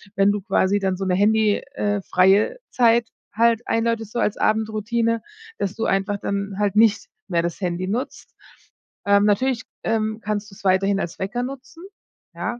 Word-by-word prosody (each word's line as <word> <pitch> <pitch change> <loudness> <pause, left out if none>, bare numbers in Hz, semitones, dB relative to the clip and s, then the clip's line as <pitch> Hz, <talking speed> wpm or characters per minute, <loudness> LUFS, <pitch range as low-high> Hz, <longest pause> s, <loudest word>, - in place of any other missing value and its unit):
wenn 195 +1 +4
du 205 - -3
quasi 195 0 +1
dann 190 -2 -1
so 195 - -3
'ne 180 - +1
Handy 210 +1 +3
äh, 205 -6 -1
freie 195 - +3
Zeit 235 -1 +3 0.3
halt 230 +1 +3
einläutest, 230 -1 -1
so 240 - -3
als 210 - +1
Abendroutine, 220 +1 0 0.4
dass 200 0 -3
du 225 - -2
einfach 195 +1 0
dann 200 0 -3
halt 205 -2 0
nicht 220 -1 +3 0.2
mehr 170 -2 +1
das 170 +3 -4
Handy 180 0 -2
nutzt. 250 +8 -5 0.7
Ähm, 200 0 +4
natürlich, 230 +4 +1 0.2
ähm, 220 -1 -1
kannst 210 0 -3
du's 195 - -16
weiterhin 195 +1 +2
als 170 - -4
Wecker 230 +6 -2
nutzen, 275 +6 -9 0.5
ja, 240 - -4
210 Hz, 165 wpm, -22 LUFS, 195-230 Hz, 0.7 s, wenn